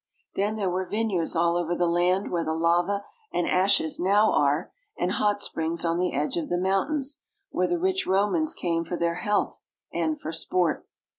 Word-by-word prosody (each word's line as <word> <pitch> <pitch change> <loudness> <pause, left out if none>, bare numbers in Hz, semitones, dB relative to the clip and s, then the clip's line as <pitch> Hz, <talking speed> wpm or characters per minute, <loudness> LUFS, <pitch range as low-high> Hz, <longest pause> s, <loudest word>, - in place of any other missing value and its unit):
Then 205 +2 0
there 205 -3 -1
were 185 0 -2
vineyards 205 -7 -1
all 170 +1 +2
over 175 0 0
the 175 - +1
land 175 +3 +1
where 170 -1 0
the 160 0 -2
lava 175 +5 +1 0.3
and 175 - 0
ashes 185 -4 +2
now 205 +4 +4
are, 145 +4 +1 0.3
and 180 - 0
hot 205 0 +1
springs 165 -3 -1
on 165 +1 +1
the 180 0 +1
edge 145 +4 -1
of 165 - -3
the 175 - +1
mountains, 265 - 0 0.3
where 180 - +1
the 350 - 0
rich 375 +2 0
Romans 210 - +2
came 165 -2 -1
for 175 +1 -4
their 170 0 0
health 205 0 0 0.3
and 160 -2 -1
for 160 - -5
sport. 165 0 -1
180 Hz, 190 wpm, -26 LUFS, 170-205 Hz, 0.3 s, now